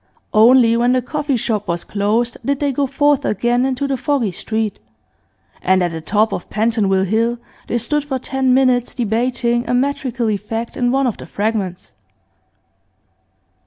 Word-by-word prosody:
Only 230 +1 +6
when 240 +2 +2
the 255 - +2
coffee 295 +1 -2
shop 215 -3 -2
was 170 0 -2
closed 215 +4 0
did 280 0 -1
they 285 -1 +1
go 275 +1 0
forth 290 +1 +2
again 240 +5 +1
into 270 +1 -2
the 270 -1 -1
foggy 265 -7 0
street, 220 +3 -3 0.8
and 185 0 +2
at 175 - 0
the 165 -1 -6
top 210 +6 +1
of - - -5
Pentonville 210 -3 +1
Hill 230 +4 0 0.3
they 240 - 0
stood 295 +5 -1
for 270 -2 -2
ten 265 0 -1
minutes 250 -2 +2
debating 240 +1 0
a 245 - +2
metrical 250 -3 -1
effect 225 +3 -4
in 245 -1 +1
one 270 +1 +2
of 240 - -1
the - - -10
Fragments. 205 -4 -3
240 Hz, 165 wpm, -18 LUFS, 215-260 Hz, 0.8 s, Only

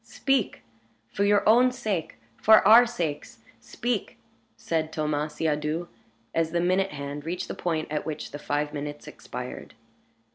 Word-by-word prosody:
"Speak! 270 -6 -1 0.5
for 200 - -1
your 205 0 +3
own 245 +4 +6
sake, 205 -9 -3 0.3
for 220 -2 +6
our 235 +3 +8
sakes, 170 -11 -4 0.2
speak!" 235 - -3 0.4
said 160 -1 -2
Thomas 150 -1 -2
Siadoux, 155 +2 -1 0.4
as 165 -1 +1
the 170 - +2
minute 185 +2 +2
hand 140 -1 -6
reached 175 +3 -4
the - - -4
point 160 -3 -2
at 150 - -1
which 155 -1 -5
the 145 - -7
five 145 0 -2
minutes 145 0 -6
expired. 125 +1 -8
160 Hz, 145 wpm, -26 LUFS, 150-200 Hz, 0.5 s, our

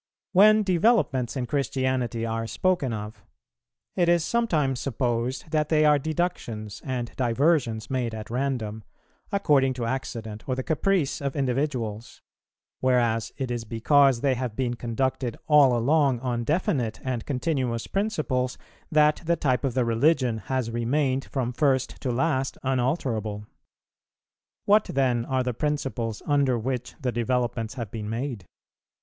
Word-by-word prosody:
_ - - -69 0.3
When 215 +3 +6
developments 180 - +2
in 125 - -1
Christianity 130 -3 -1
are 115 0 -2
spoken 155 - 0
of, 105 0 -6 0.7
it 175 -2 +2
is 170 -2 +3
sometimes 155 - +1
supposed 125 +2 -2
that 155 -2 +1
they 155 -1 +4
are 150 -1 +5
deductions 135 - -3
and 125 -3 -4
diversions 125 -3 +1
made 120 -4 -1
at 110 0 -8
random, 120 -5 -2 0.5
according 140 -9 +3
to 120 -2 -3
accident 115 -3 -5
or 130 - +1
the 130 - -3
caprice 165 -1 0
of 140 -1 -2
individuals; 125 -5 -2 0.6
whereas 120 -4 +1
it 130 -3 -3
is 120 -1 -2
because 125 +3 +3
they 135 -2 +2
have 125 -3 -3
been 125 -1 -1
conducted 120 +1 -2
all 140 -5 +6
along 135 +1 +2
on 120 -2 -2
definite 145 - 0
and 125 -3 -3
continuous 130 -4 -1
principles 155 -11 -1 0.3
that 150 -1 +4
the 170 +1 +2
type 130 -5 0
of 135 -4 -1
the 125 -2 +2
Religion 120 0 +2
has 115 +3 -2
remained 130 +3 0
from 125 -3 -2
first 135 -1 0
to 130 - -2
last 135 +1 0
unalterable. 120 -6 -1 1.2
What 210 +1 +5
then 125 -4 0
are 130 0 0
the 125 -1 -2
principles 130 -5 -2
under 140 -4 +2
which 125 +2 -3
the 130 -4 -1
developments 120 0 -1
have 115 -6 -5
been 105 -2 -5
made? 115 - -4
130 Hz, 145 wpm, -26 LUFS, 115-145 Hz, 1.2 s, When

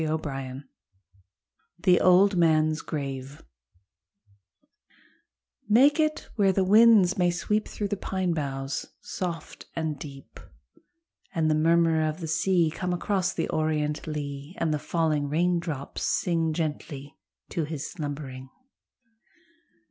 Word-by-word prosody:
155 140 -4 -3 1.2
THE 180 -2 +5
OLD 185 +2 +5
MAN'S 155 -2 +3
GRAVE 135 -2 -5 2.3
Make 275 +8 +5
it 310 0 0
where 200 -3 +4
the 190 0 +1
winds 205 -2 +6
may 175 -1 +4
sweep 210 +5 -1
Through 205 -1 -4
the 205 - 0
pine 185 -2 -1
boughs 135 -3 -3
soft 170 -4 -6
and 155 -3 -2
deep, 135 -2 -10 1.0
And 160 -2 +2
the - - +4
murmur 165 +1 +3
of 155 +2 -4
the 165 - -5
sea 165 +1 +2
Come 180 +2 -3
across 190 +1 0
the 165 - -2
orient 155 -1 -1
lea, 145 +1 -5
And 160 -2 0
the 150 - -1
falling 155 -3 0
raindrops 165 -3 -1
sing 165 -3 +1
Gently 145 -3 -4 0.3
to 165 - -2
his 150 -2 -5
slumbering. 140 -6 -6
160 Hz, 120 wpm, -27 LUFS, 150-180 Hz, 2.3 s, winds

